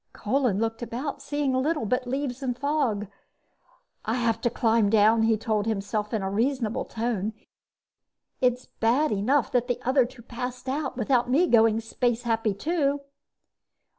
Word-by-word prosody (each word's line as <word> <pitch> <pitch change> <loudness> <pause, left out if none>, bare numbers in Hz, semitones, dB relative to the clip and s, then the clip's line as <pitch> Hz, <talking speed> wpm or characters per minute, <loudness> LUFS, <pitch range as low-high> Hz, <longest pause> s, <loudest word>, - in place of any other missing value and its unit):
Kolin 225 -2 0
looked 225 +1 -2
about, 270 +4 -4
seeing 285 -1 -1
little 265 0 0
but 250 +4 -1
leaves 265 0 -3
and 250 -3 -2
fog. 270 -7 0 1.0
"I 225 - -1
have 235 -3 0
to 240 - +2
climb 225 -2 +2
down," 220 +1 +4
he 225 0 +3
told 215 -1 -1
himself 210 0 -2
in 220 -4 -1
a 190 - -1
reasonable 235 +1 0
tone. 220 -2 -2 1.1
"It's 250 0 +1
bad 245 +7 +1
enough 230 +7 +1
that 245 -1 +1
the 245 - -1
other 260 0 +3
two 245 -1 -15
passed 250 +2 -6
out 265 -1 -2
without 245 0 +1
me 295 +8 +4
going 225 -5 +4
space 240 +1 -1
happy 225 -3 0
too." 285 - 0
240 Hz, 155 wpm, -26 LUFS, 225-265 Hz, 1.1 s, down